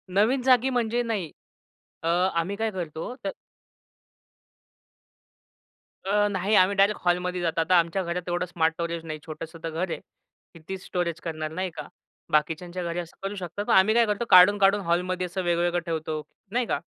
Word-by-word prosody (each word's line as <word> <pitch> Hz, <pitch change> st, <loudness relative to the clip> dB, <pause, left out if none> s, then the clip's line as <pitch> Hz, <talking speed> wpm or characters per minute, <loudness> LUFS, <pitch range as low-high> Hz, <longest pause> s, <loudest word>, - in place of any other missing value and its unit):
नवीन 240 Hz, +6 st, +3 dB
जागी 255 Hz, 0 st, +4 dB
म्हणजे 240 Hz, -1 st, 0 dB
नाही. 205 Hz, -9 st, -3 dB, 0.7 s
अ, 165 Hz, -, -1 dB
आम्ही 180 Hz, +2 st, +1 dB
काय 220 Hz, 0 st, -1 dB
करतो? 175 Hz, +4 st, -5 dB
तर 195 Hz, -, 0 dB, 2.8 s
अ, 205 Hz, +1 st, +3 dB
नाही 195 Hz, +3 st, +1 dB
आम्ही 185 Hz, +1 st, +5 dB
डायरेक्ट 200 Hz, +1 st, +3 dB
हॉलमध्ये 180 Hz, 0 st, +1 dB
जात 165 Hz, -1 st, -1 dB
आता 175 Hz, +3 st, +3 dB
आमच्या 170 Hz, +3 st, 0 dB
घरात 175 Hz, +1 st, -4 dB
एवढं 175 Hz, +1 st, 0 dB
स्मार्ट 165 Hz, -2 st, 0 dB
स्टोरेज 170 Hz, 0 st, -4 dB
नाही 155 Hz, -1 st, -5 dB
छोटंसं 160 Hz, +1 st, -8 dB
तर 165 Hz, -, -2 dB
घर 170 Hz, +3 st, -2 dB
आहे. -, -, -3 dB, 0.5 s
कितीच 185 Hz, +3 st, -8 dB
स्टोरेज 170 Hz, -2 st, -2 dB
करणार 155 Hz, -2 st, -4 dB
नाही 185 Hz, +2 st, -2 dB
का? -, -, -5 dB
आ, -, -, -13 dB, 0.4 s
बाकीच्यांच्या 170 Hz, +4 st, 0 dB
घरी 170 Hz, +1 st, -3 dB
असं 170 Hz, -1 st, -8 dB
करू 200 Hz, +1 st, -3 dB
शकतात 190 Hz, +2 st, -5 dB
मग -, -, +3 dB
आम्ही 190 Hz, +3 st, +5 dB
काय 235 Hz, -1 st, +5 dB
करतो 210 Hz, +3 st, -1 dB
काढून, 185 Hz, +3 st, +8 dB
काढून 200 Hz, +1 st, +4 dB
हॉलमध्ये 180 Hz, +1 st, 0 dB
असं 180 Hz, +1 st, -4 dB
वेगवेगळं 175 Hz, 0 st, +1 dB
ठेवतो. 160 Hz, -2 st, -3 dB, 0.3 s
नाही 245 Hz, +1 st, +1 dB
का? -, -, -1 dB
180 Hz, 175 wpm, -26 LUFS, 170-200 Hz, 2.8 s, काढून